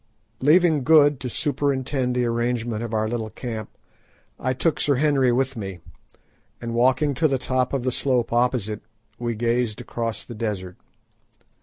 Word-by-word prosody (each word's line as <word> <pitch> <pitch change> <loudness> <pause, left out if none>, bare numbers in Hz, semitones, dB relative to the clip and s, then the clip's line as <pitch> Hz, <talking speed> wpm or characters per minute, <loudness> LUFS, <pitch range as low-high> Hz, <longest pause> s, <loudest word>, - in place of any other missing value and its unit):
Leaving 155 0 +4
Good 145 -2 +5
to 125 0 -4
superintend 135 -2 -1
the 125 -1 +1
arrangement 120 -1 -1
of 115 -1 -4
our 110 -1 0
little 110 -1 -3
camp, 110 -2 -6 0.7
I 130 - 0
took 150 +5 0
Sir 145 - +3
Henry 135 -2 +3
with 130 +2 0
me, 95 -5 -5 0.8
and 115 0 -5
walking 130 +5 +3
to 155 +4 +2
the 135 -2 +1
top 130 0 0
of 135 -3 -1
the 130 - 0
slope 125 -2 0
opposite, 120 -4 0 0.4
we 120 -1 -2
gazed 115 0 0
across 115 -2 -4
the 120 - -9
desert. 100 -5 -4
125 Hz, 155 wpm, -23 LUFS, 115-135 Hz, 0.8 s, Good